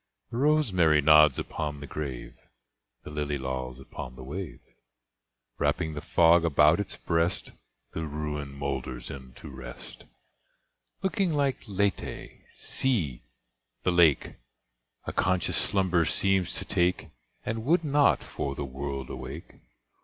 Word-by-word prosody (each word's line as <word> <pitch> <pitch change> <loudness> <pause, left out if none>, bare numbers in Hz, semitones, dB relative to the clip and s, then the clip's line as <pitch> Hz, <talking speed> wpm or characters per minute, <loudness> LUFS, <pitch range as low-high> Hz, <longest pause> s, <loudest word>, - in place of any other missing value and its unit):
The 115 - -4
rosemary 110 - +4
nods 75 -1 +7
upon 75 -2 -4
the 70 - -7
grave; 70 -4 -5 0.7
The - - -9
lily 75 -1 -2
lolls 65 -1 -4
upon 65 -1 -8
the 65 - -10
wave; 85 +5 -6 1.0
Wrapping 80 - 0
the 75 - -5
fog 85 +2 +5
about 80 +1 +5
its 100 - -4
breast, 85 +1 0 0.4
The 80 -1 -4
ruin 75 -1 -4
moulders 70 -3 -4
into 65 -2 -10
rest; 65 -2 -9 1.0
Looking 190 -3 +1
like 140 -3 +1
Lethe, 100 -1 -1 0.2
see! 90 - 0 0.6
the 90 - +2
lake 85 -5 +4 0.7
A - - -4
conscious 90 -1 +1
slumber 95 -3 +2
seems 95 +1 +1
to - - -4
take, 90 +1 +1 0.4
And 115 0 -2
would 165 +6 +3
not, 145 -1 +3
for 70 0 -4
the 70 - -3
world, 70 0 -5
awake. 65 +5 -8
75 Hz, 125 wpm, -28 LUFS, 70-95 Hz, 1.0 s, nods